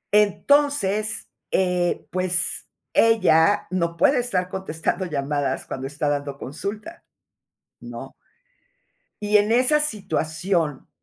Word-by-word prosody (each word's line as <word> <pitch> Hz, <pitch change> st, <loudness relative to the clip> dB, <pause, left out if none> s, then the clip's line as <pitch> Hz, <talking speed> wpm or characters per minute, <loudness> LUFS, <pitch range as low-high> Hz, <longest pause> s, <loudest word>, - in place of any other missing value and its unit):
Entonces, 215 Hz, 0 st, +2 dB, 0.2 s
eh, 180 Hz, -2 st, 0 dB
pues, 185 Hz, 0 st, +3 dB, 0.3 s
ella 205 Hz, -5 st, +3 dB
no 170 Hz, -2 st, -1 dB
puede 255 Hz, -, +3 dB
estar 195 Hz, -7 st, 0 dB
contestando 185 Hz, 0 st, -3 dB
llamadas 145 Hz, -3 st, -2 dB
cuando 135 Hz, 0 st, -5 dB
está 145 Hz, +1 st, -3 dB
dando 145 Hz, -1 st, -2 dB
consulta, 210 Hz, -, -7 dB, 0.8 s
¿no? -, -, -9 dB, 1.1 s
Y 210 Hz, 0 st, +4 dB
en 210 Hz, +2 st, +2 dB
esa 255 Hz, +5 st, +3 dB
situación, 175 Hz, -, -2 dB
185 Hz, 100 wpm, -23 LUFS, 160-215 Hz, 1.1 s, Y